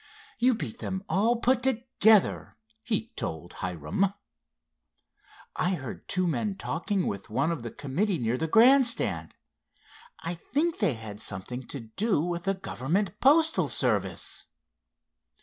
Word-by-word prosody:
"You 250 0 +4
beat 145 - -6
them 190 0 -4
all 210 +8 +2
put 245 +2 +2
together," 235 -4 +2 0.3
he 225 0 -2
told 80 +2 -4
Hiram. 90 - -1 1.4
"I 185 +1 +1
heard 130 -7 -8
two 185 0 0
men 175 - -1
talking 195 +2 -2
with 100 +2 -4
one 135 +9 +1
of 165 -6 -3
the 115 - -5
committee 170 - -1
near 120 -3 0
the 160 +5 -2
grand 250 - +6
stand. 235 - +1 0.8
I 170 - -3
think 300 - -1
they 180 - +2
had 110 -2 -8
something 120 +6 -4
to 140 - -6
do 190 - -1
with 175 +2 -2
the 195 0 +1
government 185 - -2
postal 290 - +4
service." 100 -8 -1
175 Hz, 135 wpm, -28 LUFS, -, 1.4 s, grand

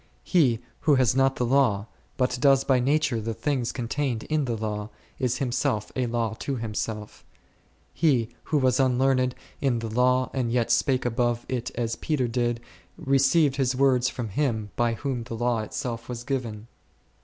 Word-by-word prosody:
He 130 - +3 0.2
who 150 -2 +3
has 130 -2 +3
not 135 0 +3
the 125 - 0
law, 120 -6 +2 0.3
but 125 -1 0
does 135 -2 +5
by 130 -2 +3
nature 140 -2 +1
the 115 +1 -3
things 135 -5 -1
contained 125 -1 -2
in 155 -2 0
the 120 -3 -2
law, 105 -1 -3 0.3
is 125 -2 0
himself 125 -3 -1
a 125 -2 0
law 115 -2 -1
to 140 - -2
himself; 110 -2 -4 0.7
he 130 -9 +2 0.2
who 155 - +1
was 130 -2 +2
unlearned 130 0 +2 0.3
in 130 -4 +2
the 115 -1 -4
law 125 +2 +2
and 125 -3 -1
yet 120 -1 +1
spake 130 -3 +2
above 120 0 0
it 125 -1 -2
as 115 -1 -2
Peter 145 -6 0
did, 120 0 -1 0.4
received 140 +2 +3
his 130 -2 +1
words 130 -2 +3
from 120 -4 -5
Him 110 -3 -1
by 120 -1 +1
whom 130 -1 -3
the 115 - -6
law 120 0 0
itself 115 +2 -5
was 120 -1 -5
given. 120 -6 -3
125 Hz, 170 wpm, -26 LUFS, 115-135 Hz, 0.7 s, does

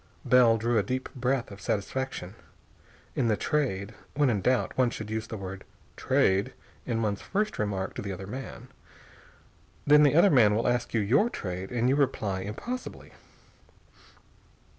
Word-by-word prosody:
Bell 120 -3 +5
drew 115 +1 +1
a - - +3
deep 130 +4 -3
breath 130 -2 -1
of 100 0 -11
satisfaction. 105 -3 -3 0.8
In 120 - +1
the 110 -2 +2
Trade, 110 -9 -1 0.2
when 145 -3 +3
in 105 -4 -1
doubt, 125 +5 +1
one 130 -2 +3
should 110 -2 -7
use 110 0 -3
the 110 - -6
word 95 0 -7 0.3
"Trade" 95 +1 +1 0.3
in 115 -1 -1
one's 100 -2 -1
first 210 +2 -2
remark 100 -3 -2
to - - -5
the 100 - -5
other 95 +1 -6
man. 130 +7 -8 1.2
Then 150 +1 +7
the 145 -1 +4
other 175 +4 +6
man 110 -7 +5
will 115 - 0
ask 120 -1 0
your 120 - +3
trade, 95 - -5
and 120 0 0
you 135 - +3
reply 115 -9 0
impossibly. 115 - -6
115 Hz, 160 wpm, -28 LUFS, 100-130 Hz, 1.2 s, Then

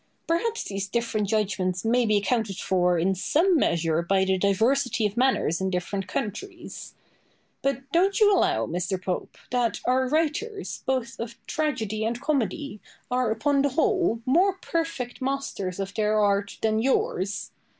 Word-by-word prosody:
Perhaps 440 +8 0
these 195 0 -4
different 220 -1 -1
judgments 190 -3 0
may 240 +1 +3
be 215 -1 +4
accounted 205 -1 0
for 180 -2 +2
in 180 +4 +2
some 330 - +2
measure 165 - +2
by 190 +2 +2
the 190 0 +2
diversity 225 +6 +2
of 205 0 -1
manners 240 - +2
in 190 - 0
different 185 +1 -3
countries. 345 - -6 0.7
But 275 -1 -1
don't 385 +6 +3
you 415 -2 +6
allow, 115 - +2
Mr. 180 - -2
Pope, 185 -1 -4
that 245 -3 +1
our 255 +1 +2
writers, 325 - -1
both 255 -3 -1
of 230 -1 -5
tragedy 225 -9 -1
and 230 +2 -1
comedy, 280 -3 -1 0.3
are, 250 -2 +1
upon 275 +6 +2
the 285 - +2
whole, 330 - +1
more 355 +9 +4
perfect 330 -9 -3
masters 255 -9 -3
of 195 0 -3
their 215 0 +1
art 200 -1 +1
than 220 0 +2
yours? 200 -6 0
225 Hz, 150 wpm, -26 LUFS, 195-280 Hz, 0.7 s, you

